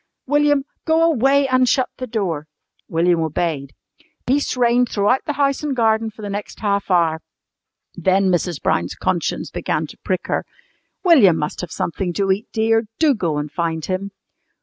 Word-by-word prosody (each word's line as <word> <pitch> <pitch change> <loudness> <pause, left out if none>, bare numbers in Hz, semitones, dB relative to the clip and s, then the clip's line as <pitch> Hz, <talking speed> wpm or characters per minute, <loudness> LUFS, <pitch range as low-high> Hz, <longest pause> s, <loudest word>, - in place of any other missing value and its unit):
"William, 290 0 +2 0.2
go 325 0 +3
away 280 -3 +3
and 255 -1 +3
shut 260 -2 +2
the 255 - -5
door." 180 -10 -2 0.4
William 170 +1 +2
obeyed. 155 -3 -2 0.5
Peace 275 0 0
reigned 245 0 +3
throughout 210 +5 +1
the 295 - 0
house 275 -1 +1
and 295 -3 -2
garden 225 -1 +2
for 215 0 -13
the 205 - -4
next 205 +1 -6
half 200 -2 0
hour. 165 -3 +2 0.7
Then 190 0 +2
Mrs. 175 -2 -1
Brown's - - 0
conscience - - -2
began - - -2
to - - -13
prick - - -2
her. - - -1 0.6
"William 260 - +6
must 150 -1 -3
have 175 -3 -7
something 175 +1 -3
to 195 +1 +1
eat, 200 +3 -1
dear. 225 0 +1
Do 310 -3 +4
go 170 - -1
and 150 0 -4
find 165 -2 -2
him." 190 +1 -3
205 Hz, 170 wpm, -20 LUFS, 175-255 Hz, 0.7 s, William